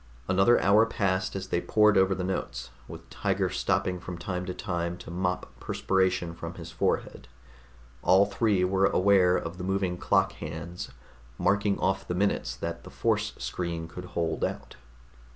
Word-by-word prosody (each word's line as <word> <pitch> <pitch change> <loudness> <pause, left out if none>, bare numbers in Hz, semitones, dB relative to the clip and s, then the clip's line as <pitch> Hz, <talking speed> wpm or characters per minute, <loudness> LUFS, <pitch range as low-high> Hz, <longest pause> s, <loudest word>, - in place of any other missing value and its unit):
Another 95 +6 +4
hour 105 +4 +5
passed 95 -4 0
as 95 0 -5
they 85 - +1
pored 105 -1 +4
over 95 0 +4
their 90 -1 -3
notes, 60 -10 -4 0.2
with - - -10
Tiger - - 0
stopping 90 -1 0
from 90 0 -7
time 90 +1 -4
to - - -2
time 85 -1 -3
to 90 - -10
mop 90 +1 -2
perspiration 95 -3 0
from 85 0 -7
his 85 -1 -9
forehead. 80 - -1 0.7
All 95 +2 +5
three 100 -2 +1
were 95 +1 +3
aware 90 -1 +4
of 85 +3 -5
the - - -4
moving 95 -2 -1
clock 95 -1 +2
hands, 80 +1 -7 0.5
marking 100 0 +2
off 95 +1 0
the 90 - -2
minutes 100 +2 0
that - - -5
the - - -10
force - - 0
screen 85 -2 -4
could 90 +2 -8
hold 80 -1 0
out. - - -3
95 Hz, 165 wpm, -28 LUFS, 85-95 Hz, 0.7 s, hour